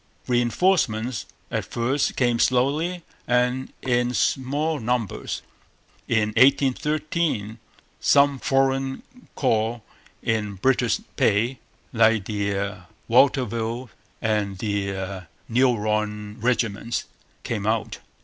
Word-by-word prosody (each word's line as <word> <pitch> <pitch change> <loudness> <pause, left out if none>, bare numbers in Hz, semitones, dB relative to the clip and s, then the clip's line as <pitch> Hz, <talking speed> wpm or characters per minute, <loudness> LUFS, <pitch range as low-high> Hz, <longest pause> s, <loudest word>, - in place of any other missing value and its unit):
Reinforcements 120 - +1 0.2
at - - -1
first 130 +4 -1
came 120 -2 +2
slowly 150 +9 +1 0.2
and 125 +2 +1
in 125 -1 +1
small 145 +4 0
numbers. 120 -3 -2 0.6
In 110 -2 +2
1813 140 -1 +1 0.4
some 140 -1 +4
foreign 135 -1 +1 0.3
corps 115 -3 0 0.4
in 105 -3 -1
British 125 +2 +1 0.2
pay, 115 +5 +2 0.3
like 115 -3 +4
the 100 -1 -2 0.3
Watteville 120 -1 +2 0.3
and 105 -3 0
the 100 -2 -3 0.2
Meuron 105 -3 0
regiments, 115 -2 0 0.4
came 105 -3 -3
out. 110 -1 -1
120 Hz, 85 wpm, -24 LUFS, 105-130 Hz, 0.6 s, some